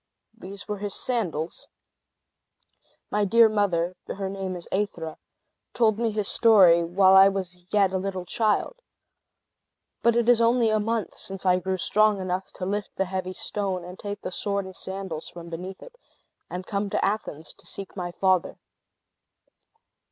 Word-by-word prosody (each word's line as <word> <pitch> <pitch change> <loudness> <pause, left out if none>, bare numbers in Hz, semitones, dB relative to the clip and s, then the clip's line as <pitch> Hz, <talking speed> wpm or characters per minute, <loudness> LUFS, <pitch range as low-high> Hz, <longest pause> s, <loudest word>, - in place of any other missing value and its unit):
"These 200 -2 -9
were 210 -1 -4
his 205 0 -2
sandals. 180 -10 -2 1.4
My 210 0 +1
dear 230 +3 +6
mother 185 -5 0
(her 195 -1 -4
name 190 -1 -4
is 175 - -7
Aethra) 175 -5 -2 0.6
told 220 -3 +3
me 235 -1 +1
his 210 -2 -1
story 185 -7 +6
while 185 +3 +4
I 195 +1 +9
was 180 -2 -6
yet 200 -3 +3
a 190 - +1
little 190 -1 -4
child. 220 - 0 1.2
But 235 0 +3
it 235 -1 +2
is 240 -1 +5
only 230 -1 +3
a 215 - +2
month 225 0 -2
since 195 -1 -6
I 180 0 +4
grew 190 +1 -2
strong 210 +2 +3
enough 185 0 -3
to 185 - -5
lift 205 +2 -3
the 195 - 0
heavy 185 0 -4
stone, 190 -2 -3
and 180 +1 -10
take 205 0 -5
the - - -4
sword 200 0 -1
and 190 0 -10
sandals 190 -5 -5
from 170 -1 -10
beneath 180 +3 -7
it, - - -15 0.5
and 180 +1 -5
come 200 0 -2
to - - 0
Athens 195 -7 -3
to - - -12
seek 195 -1 -5
my 175 -2 -4
father." 185 0 +1
195 Hz, 165 wpm, -25 LUFS, 185-210 Hz, 1.4 s, I